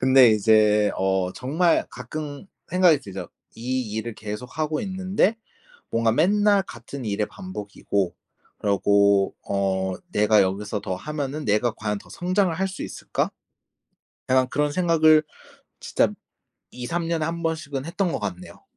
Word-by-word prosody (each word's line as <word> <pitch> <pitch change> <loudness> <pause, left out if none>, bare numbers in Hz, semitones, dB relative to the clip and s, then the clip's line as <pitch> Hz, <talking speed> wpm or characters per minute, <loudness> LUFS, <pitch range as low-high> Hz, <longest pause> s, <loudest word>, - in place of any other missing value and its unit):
근데 130 -2 +7
이제 105 0 +4
어 95 -1 0
정말 160 +7 +1
가끔 145 - -7 0.2
생각이 180 -4 +5
들죠. 95 -7 -7 0.3
'이 125 -1 -3
일을 110 0 -3
계속하고 125 +9 -3
있는데 190 +2 0 0.5
뭔가 115 -1 +2
맨날 200 - +3
같은 120 -1 -9
일의 105 0 -1
반복이고 100 - -3 0.4
그러고 100 -1 +3
어 95 -1 0 0.2
내가 105 -1 +4
여기서 100 +2 -2
더 95 - -3
하면은 150 +4 -4
내가 110 +2 +2
과연 105 -2 -3
더 - - -17
성장을 185 0 +1
할 190 +3 0
수 190 - -7
있을까?' - - -3 1.0
약간 130 0 +4
그런 145 +2 0
생각을 160 -3 +5 0.6
진짜 - - +2 0.6
2-3 165 +7 -3
년에 165 -2 0
1 170 +1 -3
번씩은 155 -5 -2
했던 175 +1 -1
것 - - -1
같네요. 90 -3 -6
125 Hz, 260 characters per minute, -24 LUFS, 105-165 Hz, 1.0 s, 근데